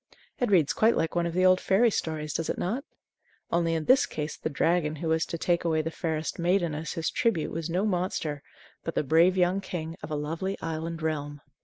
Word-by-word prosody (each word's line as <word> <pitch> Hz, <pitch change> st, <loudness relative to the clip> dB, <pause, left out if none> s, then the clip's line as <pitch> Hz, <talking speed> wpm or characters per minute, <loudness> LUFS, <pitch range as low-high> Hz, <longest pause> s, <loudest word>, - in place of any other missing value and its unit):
It 245 Hz, -, +1 dB
reads 170 Hz, -8 st, +4 dB
quite 225 Hz, +2 st, +3 dB
like 165 Hz, -, 0 dB
one 170 Hz, -1 st, +1 dB
of 170 Hz, -, -5 dB
the 185 Hz, 0 st, +3 dB
old 185 Hz, 0 st, +5 dB
fairy 225 Hz, +4 st, +3 dB
stories, 155 Hz, -5 st, -2 dB
does 165 Hz, -, -2 dB
it -, -, -1 dB
not? 230 Hz, +10 st, -2 dB, 0.7 s
Only 165 Hz, -1 st, +2 dB
in 160 Hz, -1 st, -2 dB
this 260 Hz, +1 st, +5 dB
case 150 Hz, 0 st, -4 dB
the -, -, -4 dB
dragon 155 Hz, +1 st, +1 dB
who 160 Hz, +2 st, -3 dB
was 160 Hz, 0 st, +1 dB
to 170 Hz, -, -4 dB
take 170 Hz, +1 st, +1 dB
away 160 Hz, -2 st, +1 dB
the 160 Hz, -, -3 dB
fairest 160 Hz, -1 st, -3 dB
maiden 175 Hz, -1 st, +2 dB
as 155 Hz, +2 st, -4 dB
his 160 Hz, -1 st, -2 dB
tribute 205 Hz, -10 st, 0 dB
was 165 Hz, 0 st, -4 dB
no 180 Hz, +5 st, 0 dB
monster, 175 Hz, -6 st, -1 dB, 0.4 s
but 165 Hz, -, -4 dB
the -, -, +1 dB
brave 165 Hz, +6 st, +4 dB
young 185 Hz, +2 st, +2 dB
king 165 Hz, -4 st, -5 dB
of -, -, -7 dB
a 155 Hz, -, -2 dB
lovely 165 Hz, +6 st, -3 dB
island 165 Hz, 0 st, -4 dB
realm. 145 Hz, -2 st, -3 dB
165 Hz, 220 wpm, -28 LUFS, 155-180 Hz, 0.7 s, old